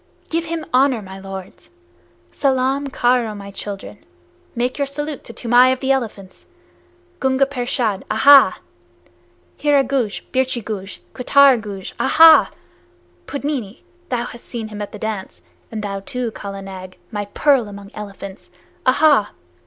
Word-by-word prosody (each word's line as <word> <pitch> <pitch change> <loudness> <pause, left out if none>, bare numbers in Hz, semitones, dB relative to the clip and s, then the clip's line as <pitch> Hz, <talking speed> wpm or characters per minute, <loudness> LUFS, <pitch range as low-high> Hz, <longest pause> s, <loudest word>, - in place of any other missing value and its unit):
Give 330 +1 0
him 330 -1 -4
honor, 255 -3 +3
my 190 0 -10
lords! 195 -1 -9 0.6
Salaam 270 +1 0
karo, 245 -4 +1
my 200 -1 -9
children. 200 0 -7 0.5
Make 250 +4 -1
your 280 - 0
salute 295 0 -5
to - - -6
Toomai 245 +2 +4
of 260 - -1
the 265 0 0
Elephants! 210 -8 -4 0.7
Gunga 265 +1 +2
Pershad, 245 -6 -1
ahaa! 275 +5 +6 1.0
Hira 290 -2 +3
Guj, 250 -5 -2
Birchi 260 -2 0
Guj, 200 -3 -6
Kuttar 270 -1 +5
Guj, 200 -3 -7
ahaa! 325 0 +7 0.8
Pudmini, 280 -7 -4 0.3
thou 245 -2 -1
hast 235 -1 -9
seen 225 -2 -5
him 210 -1 -7
at 205 - -5
the - - -8
dance, 215 -3 -5 0.3
and 215 -1 -5
thou 195 -1 -3
too, 250 +2 -4
Kala 195 -2 -7
Nag, 185 -1 -9
my 205 -2 -3
pearl 260 +2 +2
among 200 0 -10
elephants! 200 -2 -9 0.4
ahaa! 275 -5 +4
240 Hz, 135 wpm, -20 LUFS, 200-270 Hz, 1.0 s, ahaa